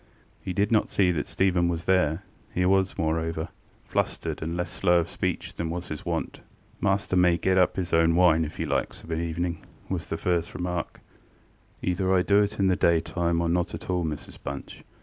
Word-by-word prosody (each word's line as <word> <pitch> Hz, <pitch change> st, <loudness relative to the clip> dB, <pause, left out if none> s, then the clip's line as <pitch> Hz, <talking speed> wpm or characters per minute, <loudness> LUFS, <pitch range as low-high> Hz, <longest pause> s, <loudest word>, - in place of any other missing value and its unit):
He -, -, -4 dB
did 100 Hz, +4 st, +1 dB
not 110 Hz, -2 st, +3 dB
see 95 Hz, -3 st, +3 dB
that 75 Hz, -4 st, -2 dB
Stephen 90 Hz, -2 st, +2 dB
was 85 Hz, -1 st, -2 dB
there: 90 Hz, -1 st, +2 dB, 0.3 s
he 90 Hz, -, 0 dB
was, 95 Hz, 0 st, +2 dB
moreover, 80 Hz, +1 st, -1 dB, 0.3 s
flustered -, -, -2 dB
and 85 Hz, +2 st, -3 dB
less 90 Hz, -, -2 dB
slow 90 Hz, -2 st, +3 dB
of 80 Hz, -, -5 dB
speech -, -, -3 dB
than 85 Hz, -, -3 dB
was 85 Hz, +1 st, -4 dB
his 75 Hz, -, -5 dB
wont. -, -, -3 dB, 0.4 s
ŌĆ£Master 95 Hz, -1 st, +1 dB
may 90 Hz, -1 st, +4 dB
get 95 Hz, +1 st, +2 dB
up 90 Hz, -, +3 dB
his 90 Hz, -3 st, -3 dB
own 80 Hz, 0 st, +4 dB
wine, 85 Hz, -2 st, +5 dB
if 80 Hz, 0 st, -6 dB
he -, -, -2 dB
likes, -, -, -2 dB
of 80 Hz, -, -9 dB
an 80 Hz, 0 st, -1 dB
evening, 85 Hz, +1 st, -2 dB
ŌĆØ -, -, -19 dB
was -, -, -3 dB
his -, -, -3 dB
first 85 Hz, -2 st, 0 dB
remark. 90 Hz, -1 st, -3 dB, 0.8 s
ŌĆ£Either 95 Hz, +1 st, +2 dB
I 90 Hz, -, +3 dB
do 100 Hz, +1 st, +4 dB
it 105 Hz, 0 st, -1 dB
in 100 Hz, -, +3 dB
the 95 Hz, -1 st, +4 dB
daytime 85 Hz, 0 st, +1 dB
or 85 Hz, -, 0 dB
not 85 Hz, +1 st, 0 dB
at -, -, -5 dB
all, 90 Hz, -1 st, +1 dB
Mrs 75 Hz, -2 st, -5 dB
Bunch. 70 Hz, 0 st, -7 dB
85 Hz, 210 wpm, -26 LUFS, 80-90 Hz, 0.8 s, wine